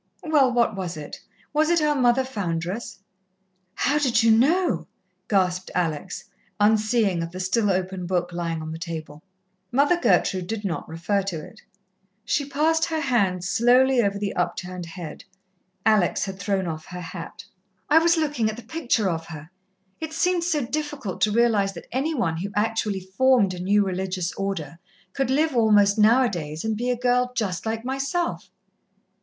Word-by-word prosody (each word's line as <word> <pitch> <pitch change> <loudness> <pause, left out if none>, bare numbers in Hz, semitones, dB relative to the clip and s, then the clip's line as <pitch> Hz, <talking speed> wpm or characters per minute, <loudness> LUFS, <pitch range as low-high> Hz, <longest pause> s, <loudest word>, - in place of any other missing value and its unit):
"Well, 290 -5 +3
what 235 -3 +2
was 180 -4 -4
it? 150 -1 -8 0.3
Was 310 +1 +2
it 345 -1 +4
our 300 -1 +2
Mother 250 -1 +3
Foundress?" 195 -1 -4 0.7
"How 295 +2 +1
did 245 -6 +2
you 225 - +5
know?" 255 - +2 0.4
gasped 185 -2 +1
Alex, 170 0 -2 0.4
unseeing 215 -3 +2
of 165 - -3
the 185 +2 -8
still 205 +3 +1
open 185 -1 -2
book 180 -1 -1
lying 165 -2 -3
on 155 - -6
the 160 - -6
table. 160 -3 -7 0.5
Mother 285 +7 +3
Gertrude 185 -4 +2
did 220 0 -4
not 165 -6 -3
refer 170 +5 -1
to 175 -5 -5
it. 220 - -15 0.6
She 285 -1 -1
passed 320 +3 +2
her 320 -1 -2
hand 200 - +1
slowly 245 +6 +4
over 200 -2 0
the 200 -1 -2
upturned 180 0 -3
head. 165 -2 -8 0.6
Alex 215 -5 +3
had 190 -1 -7
thrown 195 -2 -1
off 155 -2 -5
her 180 - -7
hat. 165 - -8 0.4
"I 315 - +6
was 335 +1 +3
looking 295 -8 0
at 215 - -5
the 240 - -9
picture 240 -5 0
of 165 -2 -2
her. 160 0 -10 0.5
It 315 -1 -5
seemed 355 +1 +1
so 310 -6 0
difficult 295 -7 -4
to 215 - +3
realize 215 -3 +2
that 170 - -10
any 290 +6 -1
one 165 - 0
who 195 +4 -4
actually 210 -2 0
formed 200 +1 +2
a 180 - -7
new 200 +3 +2
religious 185 -1 -2
Order 170 -6 -4 0.3
could 270 -2 -1
live 295 +2 +1
almost 210 -3 +4
now 230 +5 +6
a - - +3
days 160 -3 -5
and 220 -1 0
be 240 +3 -2
a 250 - 0
girl 250 0 +1
just 210 -4 -2
like 225 +1 -3
myself." 275 +7 -2
210 Hz, 170 wpm, -24 LUFS, 180-255 Hz, 0.7 s, I